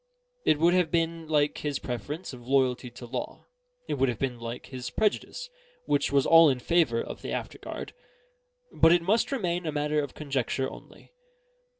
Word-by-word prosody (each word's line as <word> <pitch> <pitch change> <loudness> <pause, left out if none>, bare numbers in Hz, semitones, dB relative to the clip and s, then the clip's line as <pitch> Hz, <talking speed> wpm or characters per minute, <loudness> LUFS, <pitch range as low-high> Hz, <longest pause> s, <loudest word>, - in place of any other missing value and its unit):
It 155 - +5
would 170 +3 +4
have 180 -3 +3
been 165 0 -1
like 150 -2 +1
his 145 -2 -2
preference 140 - -5
of 120 -1 -11
loyalty 130 -2 +2
to 120 +1 -11
law; 125 +1 -6 0.4
it - - -2
would 135 - +3
have 120 - -2
been 125 -1 -2
like 115 +1 -6
his 125 -2 -6
prejudice, 220 - -1 0.4
which 145 -1 +1
was 140 -1 +3
all 165 -1 +8
in 130 - +1
favour 145 -4 +2
of - - -8
the - - -5
after - - -4
guard. - - -7 0.8
But 165 +1 +5
it 175 -1 +3
must 215 +9 +2
remain 180 -9 -1
a - - 0
matter 150 0 0
of 145 -3 -6
conjecture 135 -2 -1
only. - - -13
145 Hz, 185 wpm, -28 LUFS, 130-165 Hz, 0.8 s, all